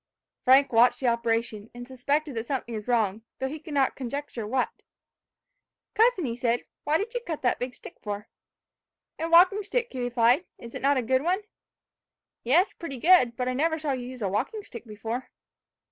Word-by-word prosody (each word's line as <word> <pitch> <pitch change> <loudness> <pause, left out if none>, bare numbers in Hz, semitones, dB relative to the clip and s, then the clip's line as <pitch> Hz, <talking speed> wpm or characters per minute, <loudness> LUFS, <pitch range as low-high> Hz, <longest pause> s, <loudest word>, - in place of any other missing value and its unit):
Frank 265 +1 +5
watched 235 +2 +5
the 265 - -4
operation, 230 -2 0
and 245 0 -8
suspected 280 +3 -1
that 225 0 -4
something 260 -4 -3
was 215 0 -6
wrong, 220 -4 +1 0.2
though 265 - -2
he 305 +4 -6
could 300 -1 -8
not 270 -2 +2
conjecture 260 -3 -5
what. 255 +3 0 1.2
"Cousin," 420 - +2
said 240 0 0
he, - - -30 0.2
"what 305 +2 +3
did 430 +6 -4
you 485 - -1
cut 335 - -6
that 245 - +1
big 250 0 -4
stick - - -12
for?" 205 0 -5 0.9
"A 325 +1 -2
walking 365 +5 +6
stick," 475 +4 -2
he 260 - -5
replied: 245 +6 +3
"Is 235 - -11
it - - -6
not 280 +1 +3
a 255 - 0
good 260 +3 +2
one?" 360 +6 0 1.0
"Yes, 325 - +3
pretty 280 -6 -7
good; 255 -5 +5
but 250 - -1
I 255 - 0
never 320 +5 +1
saw 305 -2 -2
you 250 -2 -3
use 255 -3 -7
a - - +1
walking 310 - -2
stick 240 - -10
before." 225 +4 -5
255 Hz, 190 wpm, -27 LUFS, 235-310 Hz, 1.2 s, walking